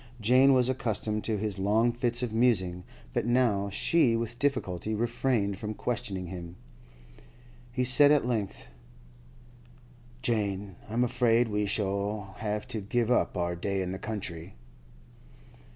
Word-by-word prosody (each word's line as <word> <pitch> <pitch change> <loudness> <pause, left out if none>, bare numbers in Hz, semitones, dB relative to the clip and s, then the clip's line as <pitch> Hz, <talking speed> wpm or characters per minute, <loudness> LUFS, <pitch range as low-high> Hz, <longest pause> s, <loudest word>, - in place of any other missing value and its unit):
Jane 130 +5 +5
was 125 -1 +3
accustomed 110 -4 -2
to 110 -2 0
his 100 -2 -3
long 110 +5 +2
fits 120 0 0
of 115 -3 -3
musing, 95 -7 +2 0.3
but - - -1
now 120 -5 +2
she 120 +4 +2
with 115 +1 -4
difficulty 110 -8 -1
refrained 115 -3 0
from 110 0 -4
questioning 100 -6 -3
him. 85 -1 -8 1.2
He 125 +1 -1
said 140 +3 +6
at 145 -4 +4
length: 110 -5 -3 1.6
'Jane, 100 -4 -1
I'm 115 +3 +1
afraid 120 -1 +2
we 105 0 0
shall 100 -1 -2
have 105 -1 -3
to 110 - -2
give 120 +3 0
up 125 - +1
our 85 0 -1
day 95 +2 -2
in 90 - -4
the 95 - -5
country. 95 -5 -5
110 Hz, 135 wpm, -28 LUFS, 100-120 Hz, 1.6 s, said